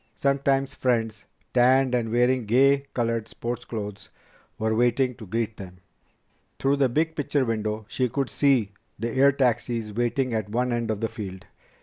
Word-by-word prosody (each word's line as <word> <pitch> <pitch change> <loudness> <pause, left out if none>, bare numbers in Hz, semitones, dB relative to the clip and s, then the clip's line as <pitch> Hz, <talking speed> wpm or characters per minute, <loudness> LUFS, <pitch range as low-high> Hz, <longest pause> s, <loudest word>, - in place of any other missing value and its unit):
Sometimes 140 -1 +1
friends, 115 -5 -1 0.3
tanned 130 +1 +4
and 115 -2 0
wearing 125 0 +2
gay 140 +4 +4
colored 115 -2 -1
sports 120 +1 -5
clothes, 105 -3 -6 0.5
were 110 0 0
waiting 120 +3 +2
to 110 -3 -11
greet 115 +2 -2
them. 90 -2 -10 0.8
Through 140 +1 +1
the 135 -2 +3
big 160 +6 0
picture 145 -2 0
window 110 -1 -2
She 125 +2 -1
could 135 +3 -2
see 130 -8 +2 0.3
the 115 0 -3
air 140 +3 +5
taxis 120 -4 0
waiting 120 +2 0
at 110 -2 -2
one 125 +3 0
end 120 -1 -2
of 110 -1 -2
the 115 - +1
field. 95 -4 -8
120 Hz, 160 wpm, -25 LUFS, 110-130 Hz, 0.8 s, air